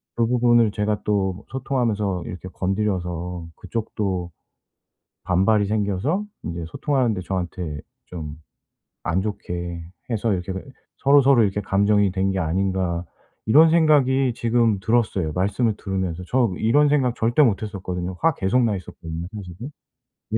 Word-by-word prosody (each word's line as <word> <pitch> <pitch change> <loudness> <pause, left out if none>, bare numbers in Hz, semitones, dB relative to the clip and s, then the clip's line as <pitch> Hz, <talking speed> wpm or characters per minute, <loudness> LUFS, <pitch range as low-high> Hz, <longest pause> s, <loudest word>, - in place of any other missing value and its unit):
그 115 - +2
부분을 120 -2 +3
제가 105 0 -1
또 100 -1 -1
소통하면서 115 -8 -1
이렇게 90 +1 -7
건드려서 90 -3 -2
그쪽도 95 -6 -3 0.9
반발이 100 +3 +2
생겨서 105 - 0 0.2
이제 85 0 -4
소통하는 130 - 0
데 95 - -4
저한테 90 -4 -4 0.3
좀 80 -4 -7 0.7
안 90 - 0
좋게 85 -4 -4 0.3
해서 115 0 0
이렇게 90 -1 -2
왜 95 - -5 0.4
'서로서로 140 -2 +5
이렇게 100 0 0
감정이 100 0 +2
된 95 +1 0
게 95 - -2
아닌가.' 90 0 0 0.4
이런 160 +8 +7
생각이 135 -6 +4
지금 115 -3 +2
들었어요 100 -6 +1
말씀을 100 +4 +1
들으면서. 95 -3 -3
저 120 -2 +2
이런 145 +7 +4
생각 130 -5 +2
절대 120 +6 +2
못 110 -7 +3
했었거든요. 90 -3 -4
화 165 -1 +4
계속 100 +6 +2
나 110 -3 +1
있었거든요 85 -2 -7
사실은. 100 - -8 0.6
예. - - +3
100 Hz, 315 characters per minute, -23 LUFS, 90-120 Hz, 0.9 s, 이런